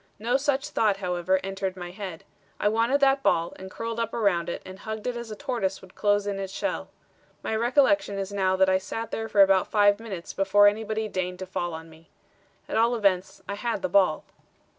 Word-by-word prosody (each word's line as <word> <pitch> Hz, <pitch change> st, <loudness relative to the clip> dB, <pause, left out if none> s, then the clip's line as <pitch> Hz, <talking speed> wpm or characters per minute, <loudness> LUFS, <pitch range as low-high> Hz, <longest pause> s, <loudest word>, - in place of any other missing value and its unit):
No 235 Hz, +4 st, 0 dB
such 270 Hz, 0 st, 0 dB
thought, 210 Hz, -3 st, +2 dB
however, 180 Hz, 0 st, 0 dB
entered 195 Hz, -1 st, -3 dB
my 175 Hz, -1 st, -6 dB
head. 185 Hz, -4 st, -7 dB, 0.4 s
I -, -, +2 dB
wanted 230 Hz, +6 st, +2 dB
that 270 Hz, 0 st, +4 dB
ball 170 Hz, -7 st, +1 dB
and 190 Hz, -, -9 dB
curled 230 Hz, +3 st, -5 dB
up 230 Hz, -1 st, -2 dB
around 190 Hz, -7 st, +1 dB
it -, -, -5 dB
and 185 Hz, +1 st, -10 dB
hugged 220 Hz, -1 st, -6 dB
it 250 Hz, -1 st, -1 dB
as 235 Hz, -1 st, -6 dB
a 215 Hz, -, -6 dB
tortoise 200 Hz, -5 st, -2 dB
would 185 Hz, -1 st, -16 dB
close 205 Hz, 0 st, +1 dB
in 200 Hz, -1 st, -2 dB
its 195 Hz, -1 st, -4 dB
shell. -, -, -3 dB, 0.5 s
My 220 Hz, -, -1 dB
recollection 250 Hz, 0 st, +2 dB
is 195 Hz, 0 st, -3 dB
now 190 Hz, -2 st, +2 dB
that 190 Hz, 0 st, +4 dB
I 185 Hz, 0 st, +3 dB
sat 225 Hz, +4 st, -5 dB
there 225 Hz, 0 st, -3 dB
for 205 Hz, -2 st, +6 dB
about 190 Hz, -1 st, +3 dB
five 205 Hz, -1 st, +4 dB
minutes 195 Hz, -7 st, -7 dB
before 200 Hz, +1 st, +5 dB
anybody 220 Hz, +1 st, 0 dB
deigned 180 Hz, -2 st, -3 dB
to 185 Hz, -, -6 dB
fall 175 Hz, -2 st, -3 dB
on 160 Hz, 0 st, -9 dB
me. 160 Hz, 0 st, -18 dB, 0.6 s
At -, -, -2 dB
all 230 Hz, +2 st, +3 dB
events, 195 Hz, -4 st, 0 dB
I -, -, -3 dB
had 235 Hz, +6 st, -3 dB
the 280 Hz, -, 0 dB
ball. 185 Hz, -6 st, +3 dB
200 Hz, 215 wpm, -26 LUFS, 185-225 Hz, 0.6 s, for